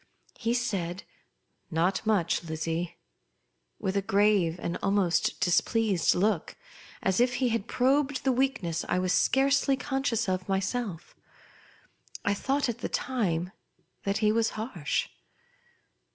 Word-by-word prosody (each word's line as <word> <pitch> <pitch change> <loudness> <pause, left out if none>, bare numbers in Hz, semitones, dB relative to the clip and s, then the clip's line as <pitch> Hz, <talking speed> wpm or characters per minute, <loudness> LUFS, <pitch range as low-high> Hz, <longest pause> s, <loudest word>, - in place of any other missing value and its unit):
He 230 0 0
said, 195 -7 -2 0.7
"ISot 170 +4 +1
much, 180 -6 +2
Lizzie," 165 +1 -3 0.8
with 190 - -2
a 200 - +2
grave 195 -4 +2
and 170 - -3
almost 195 -4 +1
displeased 195 +1 +2
look, 190 -2 0 0.5
as 190 +1 +2
if 245 0 +3
he 255 -2 +1
had 230 -2 -1
probed 265 +2 +1
the 265 - +3
weakness 245 -11 0
I 180 - +2
was 185 0 +1
scarcely 275 0 +3
conscious 265 -6 -1
of 185 0 -2
my.^eif. 195 -1 -2 1.1
I 200 - +3
thougiit 270 +6 0
at 235 - -2
the - - -3
time 185 -9 -1 0.5
that 200 +1 -1
he 210 - +5
was 225 0 +2
harsh. 215 - -2
200 Hz, 125 wpm, -28 LUFS, 180-245 Hz, 1.1 s, he